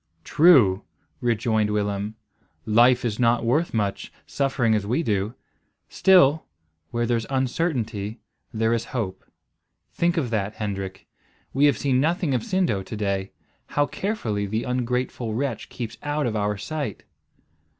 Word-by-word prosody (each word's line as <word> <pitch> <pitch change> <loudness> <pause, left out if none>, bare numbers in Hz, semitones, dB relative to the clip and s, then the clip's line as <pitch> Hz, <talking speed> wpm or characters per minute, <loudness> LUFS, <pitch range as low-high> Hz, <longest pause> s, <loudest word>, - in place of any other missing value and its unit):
"True," 130 - +5 0.4
rejoined 110 -3 +1
Willem; 105 0 -2 0.5
"life 120 +3 +4
is 110 -1 -2
not 120 -1 +3
worth 150 +9 +1
much, 100 -3 -2
suffering 135 -5 +1
as 105 -1 +1
we 125 +11 0
do; 105 -1 -1 0.5
still, 160 -6 +5 0.5
where 120 +4 -1
there's 115 -1 0
uncertainty, 125 - -1 0.3
there 115 -1 +1
is 115 - -1
hope. 95 -5 -3 0.7
Think 170 +1 +1
of 130 -8 -1
that, 105 -1 -1
Hendrik. 95 -3 -5 0.5
We 140 +2 +4
have 140 -6 +4
seen 130 -2 +1
nothing 165 -1 +1
of 125 - +1
Sindo 180 - 0
to 95 - -7
day. 100 -2 -2 0.4
How 145 - +1
carefully 120 - -2
the 110 +3 -2
ungrateful 125 -2 -2
wretch 115 -4 -3
keeps 115 -2 -6
out 145 0 -1
of 115 -2 -1
our 105 -1 0
sight!" 140 0 -4
115 Hz, 140 wpm, -24 LUFS, 105-135 Hz, 0.7 s, True